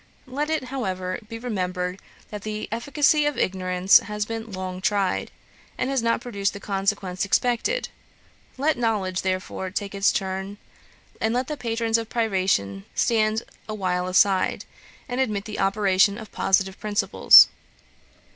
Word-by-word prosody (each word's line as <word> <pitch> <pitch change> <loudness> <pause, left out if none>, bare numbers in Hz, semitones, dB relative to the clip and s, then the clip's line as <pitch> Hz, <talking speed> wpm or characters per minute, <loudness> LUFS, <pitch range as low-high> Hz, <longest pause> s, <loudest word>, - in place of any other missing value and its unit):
Let 285 +3 -3
it, 315 -3 0
however, 185 -7 -3
be 230 - -6
remembered, 185 -5 -3 0.3
that 210 -1 -6
the 215 +1 -5
efficacy 290 +5 +2
of 295 -4 -2
ignorance 185 0 +3
has 210 0 -4
been 225 0 -6
long 185 -1 -5
tried, 195 -1 0 0.5
and 260 - -1
has 270 -3 +1
not 230 0 +1
produced 200 -5 -2
the 200 - -7
consequence 195 -2 -2
expected. 245 - 0 0.7
Let 290 0 +1
knowledge, 200 -6 0
therefore, 185 0 -3
take 200 +1 -4
its 195 0 +3
turn; 190 +1 -3 0.6
and 220 +1 +1
let 250 +1 0
the 300 - -3
patrons 230 -3 0
of 225 -1 -6
privation 185 - 0
stand 220 -1 +1 0.3
awhile 185 -4 -1
aside, 190 +1 +2 0.4
and 250 0 -1
admit 210 -5 -1
the 215 - -6
operation 195 0 +3
of 220 -2 -10
positive 190 0 +1
principles. 210 -1 +6
205 Hz, 140 wpm, -24 LUFS, 190-230 Hz, 0.7 s, principles